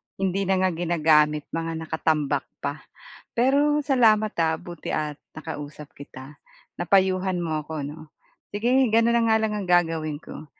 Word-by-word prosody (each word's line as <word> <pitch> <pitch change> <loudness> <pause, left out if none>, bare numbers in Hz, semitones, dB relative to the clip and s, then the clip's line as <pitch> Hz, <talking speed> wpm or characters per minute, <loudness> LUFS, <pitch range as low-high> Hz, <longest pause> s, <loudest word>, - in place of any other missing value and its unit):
hindi 195 0 -1
na 190 - +3
nga 185 - +2
ginagamit, 155 -3 +2
mga 165 0 -3
nakatambak 155 -2 -1 0.2
pa. 145 +1 -3 0.5
Pero 285 +5 +2
salamat, 225 -7 +3
ah, 160 -1 +1
buti 175 -2 -7
at 150 -1 -2 0.2
nakausap 150 -2 -8
kita. 140 +1 -11 0.4
Napayuhan 185 0 +1
mo 155 -3 -3
ako 155 -1 -5
'no? 145 +3 -7 0.5
Sige 210 +4 0 0.2
gano'n 230 +1 +4
na 235 0 +3
nga 220 -1 +4
lang 220 -1 -1
ang 200 -3 -5
gagawin 165 -4 +1
ko, - - -10
165 Hz, 145 wpm, -24 LUFS, 155-200 Hz, 0.5 s, gano'n